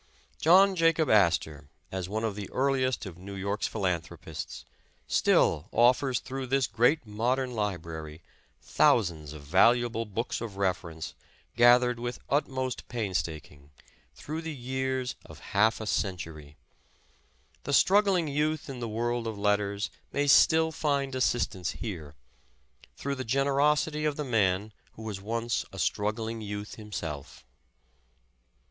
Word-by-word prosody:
John 190 +4 +6
Jacob 165 -2 +3
Astor, 80 -7 +2 0.2
as 95 -1 -4
one 110 +2 -2
of 110 -2 -1
the 100 -2 -6
earliest 130 -3 0
of 90 -3 -9
New 100 +2 -8
York's 100 +2 -2
philanthropists, 90 -6 -4 0.4
still 75 +5 +2
offers 125 +1 +3
through 135 0 -5
this 135 +1 +2
great 125 +4 +2
modern 125 +5 -1
library, 85 -7 -4 0.4
thousands 80 -9 +2
of 75 -2 -10
valu 115 +11 +4
able 115 -1 -3
books 110 +3 -3
of 110 -5 -6
reference, 90 -4 -2 0.4
gathered 120 0 +5
with 120 +1 -4
utmost 130 -3 -1
painstak 95 -9 -3
ing, 70 0 -19 0.5
through 155 - -5
the 160 -2 -5
years 130 0 -2
of - - -13 0.2
half 110 +2 +3
a 110 - -5
century. 80 -8 -3 1.1
The - - -4
struggling 190 +3 +4
youth 150 0 -1
in 130 - -7
the 120 -2 -4
world 120 +1 -1
of 110 -2 -4
letters 100 0 0 0.2
may 145 - 0
still 160 +3 +5
find 140 -4 -1
assistance 120 -8 0
here, 80 -10 -6 0.8
through 140 - -3
the 130 -1 -4
generosity 140 +4 +1
of 150 -1 0
the 150 - -3
man 105 -3 +1 0.2
who 110 - -11
was 105 -3 -5
once 115 +3 -1
a 95 - -10
struggling 110 +7 -1
youth 105 0 -6
himself. 85 -10 -7
115 Hz, 135 wpm, -28 LUFS, 95-135 Hz, 1.1 s, John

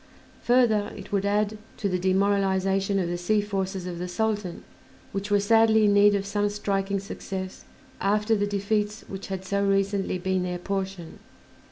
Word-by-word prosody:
Further, 230 -4 +3
it - - -10
would 200 0 +1
add 210 +1 0 0.2
to 205 - -1
the 185 -2 0
demoralization 195 +1 +1
of 185 -3 0
the 175 0 -3
sea 210 +5 +2
forces 195 -2 -3
of 175 -1 -5
the 180 - -3
Sultan, 205 -2 -2 0.5
which 200 +1 -4
were 205 0 +4
sadly 220 +1 +4
in 205 - +4
need 205 0 +6
of 195 -1 -1
some 205 +1 0
striking 200 -1 -1
success 190 -1 -6 0.3
after 210 +3 +2
the 205 -1 0
defeats 205 +1 -1
which 195 0 -7
had 190 -1 -5
so 200 +1 0
recently 195 -1 +1
been 185 +1 0
their 180 0 -2
portion. 190 -2 -4
200 Hz, 170 wpm, -26 LUFS, 190-205 Hz, 0.5 s, need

